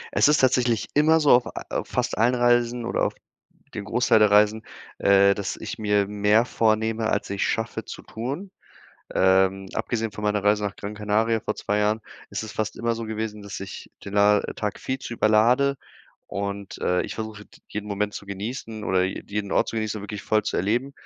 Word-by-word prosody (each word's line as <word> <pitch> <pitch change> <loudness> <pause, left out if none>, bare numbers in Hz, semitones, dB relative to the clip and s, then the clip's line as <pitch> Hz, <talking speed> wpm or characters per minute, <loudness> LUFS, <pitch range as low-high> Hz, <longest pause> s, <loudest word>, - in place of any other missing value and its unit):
Es - - +5
ist 150 0 +5
tatsächlich 125 -3 +2
immer 155 +2 +5
so 150 -2 +4
auf, 125 0 +6 0.3
äh, - - 0
fast - - -2
allen 120 +3 +4
Reisen 120 -1 +2
oder - - -1
auf - - 0 0.6
den 105 - -4
Großteil 125 0 +3
der 105 -1 +5
Reisen, 105 +2 +4 0.3
äh, 100 0 +5
dass 100 -2 -3
ich - - -6
mir 105 -2 +1
mehr 105 +3 +3
vornehme, 110 -1 +1
als - - -1
ich 100 0 -1
schaffe 115 - -2
zu - - -8
tun. 135 - -5 0.7
Ähm, 95 +1 +3
abgesehen 115 -3 -2
von 105 - -8
meiner 105 -1 0
Reise 105 0 +3
nach 100 -1 -3
Gran 105 +1 -6
Canaria 110 +2 +1
vor 105 - -3
2 105 +1 -1
Jahren 105 +1 +1 0.3
ist 100 +2 -4
es 110 - -7
fast 110 +1 -3
immer 115 0 0
so 115 0 -5
gewesen, 110 -1 -4
dass 100 0 -7
ich 95 0 -8
den 100 +1 -5
a 105 0 +5
Tag 105 -2 -3
viel 130 0 -3
zu 120 - -6
überlade. 120 +6 +3 0.5
Und, 100 0 -5
äh, 90 0 +1
ich - - -6
versuche, 110 -2 -6 0.2
jeden 105 0 -5
Moment 105 0 -1
zu 100 - -8
genießen 110 +2 -5
oder 95 -1 +2
je 95 - -4
jeden 100 -1 -3
Ort - - +2
zu 115 - -4
genießen 110 -1 -2
und - - -9
wirklich 105 -1 -6
voll 110 0 +2
zu 105 - -2
erleben. 120 +9 0
105 Hz, 200 wpm, -24 LUFS, 100-115 Hz, 0.7 s, auf